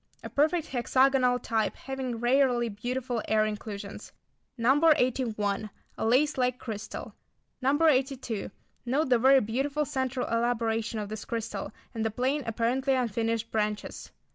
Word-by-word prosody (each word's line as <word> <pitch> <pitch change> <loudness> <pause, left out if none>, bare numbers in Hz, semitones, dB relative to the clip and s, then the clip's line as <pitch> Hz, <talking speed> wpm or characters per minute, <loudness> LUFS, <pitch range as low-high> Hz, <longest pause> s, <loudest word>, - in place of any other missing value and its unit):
A - - -7
perfect 315 +3 +2
hexagonal 255 0 +3
type 225 -3 -1
having 265 -2 -4
rarely 245 -1 +3
beautiful 245 +3 -3
air 215 0 +3
inclusions. 210 -1 -6 0.5
No. 260 +5 +3
81. 215 -5 0 0.3
A - - -3
lace 270 +4 +3
like 250 0 +1
crystal. 215 -3 -6 0.5
No. 270 +3 +3
82. 260 -6 0 0.3
Note 265 +4 0
the 245 -2 +4
very 265 +2 +6
beautiful 275 +7 -1
centre 260 -3 -2
elaboration 230 -1 0
of 210 -1 -4
this 215 -1 -5
crystal, 230 -1 -4 0.2
and 225 -2 -2
the 225 - +1
plain, 260 +6 0
apparently 250 +4 +1
unfinished 230 -2 -1
branches. 210 -1 -2
245 Hz, 135 wpm, -28 LUFS, 225-265 Hz, 0.5 s, very